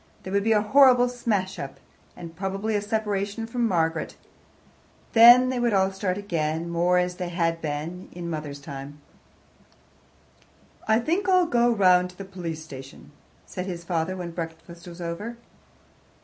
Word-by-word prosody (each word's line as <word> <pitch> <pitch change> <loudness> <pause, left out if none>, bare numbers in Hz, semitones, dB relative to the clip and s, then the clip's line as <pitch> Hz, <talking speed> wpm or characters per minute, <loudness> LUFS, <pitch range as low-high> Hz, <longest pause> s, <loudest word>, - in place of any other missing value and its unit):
There 190 - -6
would 200 0 +2
be 225 - +1
a 210 -1 +3
horrible 250 +1 +6
smash 205 -6 -2
up, 135 -3 -7 0.4
and 170 -1 -9
probably 195 +3 -2
a 205 - +1
separation 210 0 -2
from 235 +1 -1
Margaret; 165 -4 -1 1.0
then 240 +2 +8
they 255 -1 -1
would 240 -2 +1
all 190 0 +3
start 190 -1 -2
again, 165 -4 -2
more 175 +1 +2
as 180 0 0
they 180 -2 -4
had 165 -1 -1
been 155 +4 -5
in 175 - -8
his 170 - -4
mother's 150 -3 -5
time. 140 +1 -9 1.9
"I 220 0 +4
think 345 - 0
I'll 365 -1 +5
go 240 -6 +2
round 180 -4 +4
to 180 - -17
the 195 - -7
police 170 -4 -6
station," 135 -2 -11 0.3
said 180 +1 -6
his 175 -2 -5
father 175 +1 -2
when 175 -2 -5
breakfast 165 +1 -8
was 175 0 -10
over. 205 +8 -5
185 Hz, 165 wpm, -25 LUFS, 165-220 Hz, 1.9 s, then